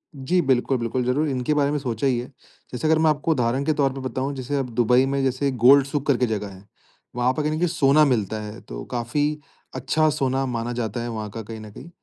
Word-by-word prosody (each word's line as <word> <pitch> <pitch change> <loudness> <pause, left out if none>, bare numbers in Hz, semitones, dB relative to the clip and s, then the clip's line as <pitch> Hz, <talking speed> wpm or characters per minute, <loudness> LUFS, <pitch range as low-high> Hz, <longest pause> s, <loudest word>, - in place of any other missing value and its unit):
जी। 145 +7 0
बिल्कुल, 130 -2 +1
बिल्कुल 120 +1 -2
ज़रूर 145 +5 +1
इनके 130 +2 -1
बारे 145 -1 +2
में 150 - 0
सोचा 125 -1 -2
ही 125 -3 +1
है। 120 - -6 0.4
जैसे 130 +5 -2
अगर 160 0 +3
मैं 160 - +4
आपको 150 +1 0
उदाहरण 125 -1 +1
के 155 - +2
तौर 140 -3 +1
पे 135 - -7
बताऊँ 135 +2 -3
जैसे 130 +2 -3
अब 135 -2 -2
दुबई 125 +2 +4
में 140 0 -1
जैसे 135 +1 0
गोल्ड 130 +3 +6
सुक 140 0 -3
करके 130 -3 +3
जगह 105 -2 -3
है। 95 +2 -16 0.5
वहाँ 125 +1 +1
पर 155 - -2
कहीं 150 - 0
न 155 - -1
कहीं 175 - +2
सोना 155 -2 +4
मिलता 110 -5 0
है 105 +2 -8
तो - - -8
काफ़ी 125 +4 -1 0.5
अच्छा 135 +5 +1
सोना 135 -2 0
माना 120 -2 -3
जाता 115 -1 -3
है 120 - -4
वहाँ 110 -2 -5
का 115 +3 -7
कहीं 110 +1 -8
न 110 0 -10
कहीं। 135 +10 -11
130 Hz, 245 wpm, -23 LUFS, 120-140 Hz, 0.5 s, गोल्ड